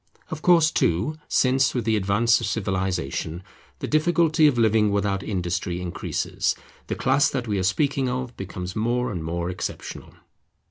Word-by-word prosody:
Of 155 -1 -5
course 165 -2 +5
too, 100 - 0
since 135 +1 +2
with 120 -3 -1
the 110 -1 +2
advance 105 +4 +2
of - - -2
Civilization 95 -5 -2 0.3
the - - -5
difficulty 160 0 +3
of 140 -4 +2
living 110 -2 +3
without 100 -1 0
industry 90 -2 -2
increases, 90 -1 -2 0.3
the - - -2
class 135 +1 +3
that 125 -3 -3
we 105 -2 0
are - - 0
speaking 135 +6 +1
of 125 0 -4
becomes 90 -1 -6
more 120 +3 0
and 85 -5 -4
more 85 +2 -2
exceptional. 90 - -6
110 Hz, 155 wpm, -24 LUFS, 95-135 Hz, 0.3 s, course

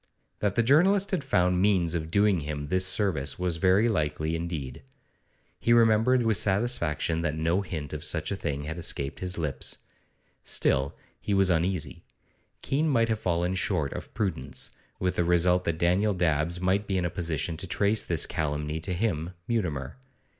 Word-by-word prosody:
That 100 -1 0
the 115 - +3
journalist 185 - +4
had 185 -7 0
found 90 -8 +2
means 95 -5 +2
of 80 -2 -3
doing 100 +1 +3
him 75 -1 -5
this 95 +1 +2
service 80 -10 0
was 90 -2 -1
very 95 +6 +4
likely 80 -5 -1
indeed. 80 -7 -5 0.8
He 120 - +3
remembered 115 +2 +4
with 110 -3 +2
satisfaction 95 -7 0
that 75 -2 -1
no 80 +4 +1
hint 80 -7 -5
of 75 0 -5
such 80 -1 -2
a - - 0
thing 75 -6 -3
had 80 +3 -5
escaped 70 -4 -3
his 90 -1 -2
own 85 - -2
lips. 75 -3 -3 0.7
Still, 70 0 +1 0.3
he 100 - 0
was 95 -1 +4
uneasy. 85 -4 -1 0.6
Keene 150 +4 +1
might 115 -4 +2
have 110 -2 0
fallen 90 -1 0
short 75 -6 -1
of - - -7
prudence, 65 -10 -3 0.3
with 90 -1 -1
the 85 - +3
result 90 +1 +3
that 85 -1 -1
Daniel 95 +5 +2
Dabbs 85 0 0
might 95 +3 +1
be 95 - 0
in 90 - 0
a 85 - -1
position 85 -1 -2
to 95 - -5
trace 100 +4 +1
this 85 -2 +1
calumny 75 -1 -2
to 85 +3 -3
him, 90 -4 -1
Mutimer. 80 - -2
90 Hz, 175 wpm, -27 LUFS, 80-100 Hz, 0.8 s, journalist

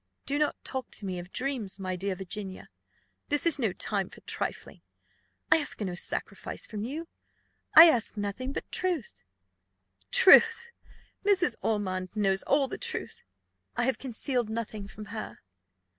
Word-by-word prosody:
"Do 285 +1 0
not 300 - +1
talk 260 -2 -4
to 205 - -5
me 185 -2 -3
of 175 +1 -10
dreams, 250 -8 -2
my 185 -1 -3
dear 190 +1 -2
Virginia; 190 +1 -6 0.6
this 290 +2 +1
is 330 -3 +3
no 225 -6 +1
time 195 +1 -2
for - - -14
trifling; - - -4 0.7
I - - +8
ask 305 - -2
no 190 -4 -2
sacrifice 175 - -4
from 210 -1 -5
you 305 +8 -5 0.7
I 325 +2 +12
ask 235 -8 +2
nothing 205 +6 -3
but - - -6
truth." 340 - -1 0.9
"Truth! 460 +5 +7 0.5
Mrs. 375 - +3
Ormond 185 -4 -1
knows 195 -2 +2
all 280 -1 +2
the - - -6
truth: - - -4 0.6
I - - +2
have 260 +1 0
concealed 250 -2 -2
nothing 220 -2 -4
from 210 +2 -10
her." 215 - -6
225 Hz, 150 wpm, -29 LUFS, 195-285 Hz, 0.9 s, I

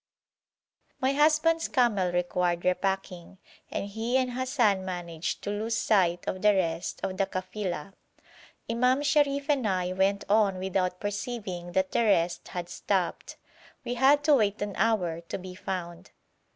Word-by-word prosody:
My 265 0 +1
husband's 310 +3 +3
camel 215 - +2
required 175 0 0
repacking, 185 -1 -2 0.3
and - - -3
he 225 +5 -1
and 255 -1 0
Hassan 245 -6 +1
managed 175 -3 -4
to 205 - -2
lose 220 +2 -1
sight 175 -6 +2
of 185 - -3
the 210 -1 +5
rest 170 -2 -2
of 185 -1 -3
the 195 - +1
kafila. 185 -2 -4 0.7
Imam 250 +4 +2
Sharif 285 -1 +2
and 275 -7 +1
I 185 -2 0
went 195 +2 +1
on 205 -2 +3
without 185 -1 -1
perceiving 205 -4 -4
that 190 0 +1
the - - +2
rest 175 -5 +1
had 175 -1 -5
stopped. 185 -1 -2 0.5
We 245 - -2
had 275 +4 +4
to 300 0 +5
wait 210 -6 +2
an 205 -1 -4
hour 185 -7 +1
to 170 - -6
be 185 -1 -9
found. 180 -2 -6
195 Hz, 150 wpm, -28 LUFS, 180-240 Hz, 0.7 s, the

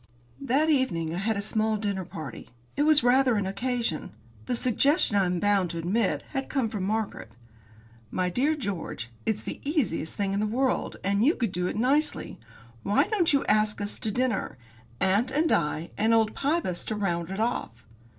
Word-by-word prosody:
That 275 +3 +2
evening 185 - +1
I 175 - -2
had 220 +2 0
a - - -1
small 220 +1 0
dinner 200 -3 -2
party. 155 -7 -8 0.3
It 290 +1 +2
was 305 -4 +6
rather 250 0 +4
an 205 -2 0
occasion. 230 - -1 0.4
The - - 0
suggestion, 255 - +2
I 195 -2 +4
am 180 -1 -1
bound 200 -2 +2
to 170 - -5
admit, 190 +6 0
had 270 -2 -3
come 260 -6 0
from 205 -4 -3
Margaret. 215 - -3 0.8
"My 185 -1 -1
dear 265 - +1
George, 190 - -5 0.2
it's 220 -2 0
the - - -6
easiest 280 - -1
thing 195 -1 -1
in 200 - 0
the 215 - 0
world, 255 +4 0
and 200 +2 +1
you 305 +7 +4
could 230 -6 -1
do 180 0 -1
it - - -3
nicely! 275 +7 +1 0.4
Why 200 +1 +3
don't 390 -7 +2
you 280 -2 +2
ask 215 0 +2
us 205 0 -2
to 220 - -1
dinner? 235 - -1 0.4
Aunt 200 +6 +2
and 310 +5 +1
I, 155 +1 0
and 225 +2 +4
old 220 -1 +2
Pybus 280 - -1
to 215 - -2
round 175 -5 -1
it 195 +2 -5
off." 220 - -2
215 Hz, 190 wpm, -27 LUFS, 190-260 Hz, 0.8 s, was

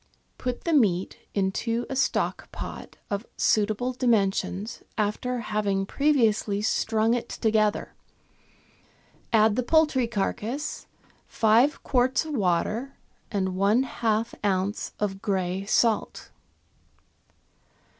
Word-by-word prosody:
— - - -44
Put 250 -1 -3
the 335 - 0
meat 195 - +2 0.2
into 230 +4 0
a 270 - -4
stock 265 - 0
pot - - -8
of 200 +3 -3
suitable 215 +4 +1
dimensions, 215 -3 0 0.2
after 230 +4 -1
having 205 -3 -1
previously 225 -6 +2
strung 220 +1 +1
it 240 -1 -2
together; 215 -2 0 1.4
add 220 -1 +4
the 255 - +1
poultry 290 -2 +3
carcase, 230 +6 -3 0.4
five 230 +6 +3
quarts 255 +3 +2
of 310 - -5
water, 215 +5 0 0.3
and 190 -3 -1
one 205 +6 +3
half 230 -2 -1
oz. 195 0 -1
of 195 -2 -2
grey 190 -2 -1
salt. 225 0 +1
220 Hz, 105 wpm, -26 LUFS, 200-245 Hz, 1.4 s, add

